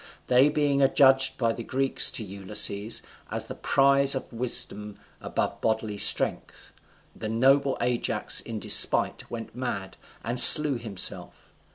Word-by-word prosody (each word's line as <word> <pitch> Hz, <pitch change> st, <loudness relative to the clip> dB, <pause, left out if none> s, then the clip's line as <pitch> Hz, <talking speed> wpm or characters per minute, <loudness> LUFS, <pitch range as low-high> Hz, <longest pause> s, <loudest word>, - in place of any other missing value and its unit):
They 130 Hz, +3 st, +1 dB
being 145 Hz, -2 st, -2 dB
adjudged 135 Hz, -1 st, +2 dB
by 115 Hz, -2 st, -2 dB
the 115 Hz, -, -10 dB
Greeks 135 Hz, +3 st, +1 dB
to 115 Hz, -, -4 dB
Ulysses, 100 Hz, +2 st, -1 dB, 0.3 s
as -, -, -7 dB
the -, -, -10 dB
prize 140 Hz, 0 st, 0 dB
of 130 Hz, -, -9 dB
wisdom 105 Hz, -3 st, -5 dB, 0.2 s
above -, -, -6 dB
bodily 110 Hz, -2 st, -4 dB
strength, -, -, -1 dB, 0.4 s
the 110 Hz, -, -8 dB
noble 135 Hz, +4 st, 0 dB
Ajax 120 Hz, -1 st, -2 dB
in 115 Hz, -2 st, -9 dB
despite -, -, +2 dB
went 115 Hz, -1 st, -10 dB
mad, 100 Hz, -7 st, -7 dB, 0.3 s
and 120 Hz, +2 st, -4 dB
slew 150 Hz, -5 st, +8 dB
himself. 105 Hz, -5 st, -4 dB
120 Hz, 135 wpm, -23 LUFS, 110-135 Hz, 0.4 s, slew